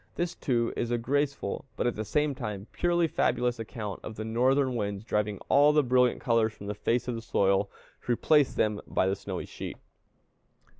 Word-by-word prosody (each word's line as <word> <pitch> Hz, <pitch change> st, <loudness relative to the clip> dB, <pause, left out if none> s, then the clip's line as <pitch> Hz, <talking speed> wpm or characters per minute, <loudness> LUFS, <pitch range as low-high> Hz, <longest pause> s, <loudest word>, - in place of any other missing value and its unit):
This 175 Hz, 0 st, -1 dB
too 120 Hz, -3 st, 0 dB
is 120 Hz, -, -2 dB
a 120 Hz, -, +1 dB
graceful, 140 Hz, -2 st, -1 dB
but, -, -, -1 dB
at 120 Hz, -, +1 dB
the 110 Hz, -, -3 dB
same 150 Hz, +7 st, +1 dB
time, 105 Hz, -6 st, -5 dB
purely 175 Hz, -1 st, +2 dB
fabulous 125 Hz, -4 st, 0 dB
account 110 Hz, -3 st, -5 dB
of 110 Hz, -, -7 dB
the 110 Hz, -, -5 dB
Northern 130 Hz, +4 st, +2 dB
winds 100 Hz, -2 st, -2 dB
driving 105 Hz, -2 st, -1 dB
all 145 Hz, +2 st, +5 dB
the 150 Hz, -1 st, +4 dB
brilliant 125 Hz, -1 st, +3 dB
colors 115 Hz, -4 st, +2 dB
from 100 Hz, -, -11 dB
the 105 Hz, -, -3 dB
face 115 Hz, +4 st, -1 dB
of 125 Hz, -, -1 dB
the 115 Hz, -, -4 dB
soil, 100 Hz, -2 st, +2 dB, 0.4 s
to -, -, +1 dB
replace 145 Hz, +4 st, +3 dB
them 105 Hz, -1 st, +1 dB
by -, -, +1 dB
the 95 Hz, +1 st, +1 dB
snowy -, -, -5 dB
sheet. -, -, -7 dB
120 Hz, 195 wpm, -28 LUFS, 105-135 Hz, 0.4 s, all